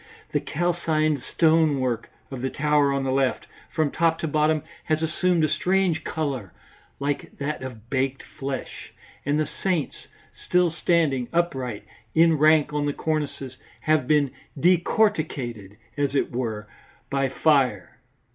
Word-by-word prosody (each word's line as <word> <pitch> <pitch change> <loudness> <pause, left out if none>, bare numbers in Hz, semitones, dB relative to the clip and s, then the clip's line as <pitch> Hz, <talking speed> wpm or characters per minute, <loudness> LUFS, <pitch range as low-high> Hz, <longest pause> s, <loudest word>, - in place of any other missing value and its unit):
The - - +1
calcined 155 -3 0
stone 160 -2 +3
work 125 -3 -2 0.2
of 130 -2 -5
the 130 - -1
tower 150 -1 +2
on 140 0 0
the 135 - 0
left, 135 -1 +1 0.2
from 155 -3 0
top 165 0 +2
to 160 - -1
bottom, 155 0 +2 0.2
has 155 0 0
assumed 170 +1 +1
a - - +4
strange 180 +2 +1
colour 135 - -3 0.5
like 140 0 -3
that 145 +2 -3
of 120 -4 -8
baked 135 0 0
flesh, 135 -1 -6 0.3
and 145 +1 +2
the 155 - +2
saints, 180 -4 -3 0.3
still 180 -1 +1
standing 155 -7 +1
upright 135 -10 -1 0.3
in 165 -1 +5
rank 155 -1 +4
on 145 0 0
the 145 - 0
cornices, 145 -5 -3 0.2
have 155 -5 +2
been 145 -3 +3 0.3
decorticated, 155 - +1 0.2
as 145 -2 0
it - - +1
were, 110 -4 -3 0.4
by 135 -1 +1
fire. 130 - +1
150 Hz, 140 wpm, -25 LUFS, 130-160 Hz, 0.5 s, in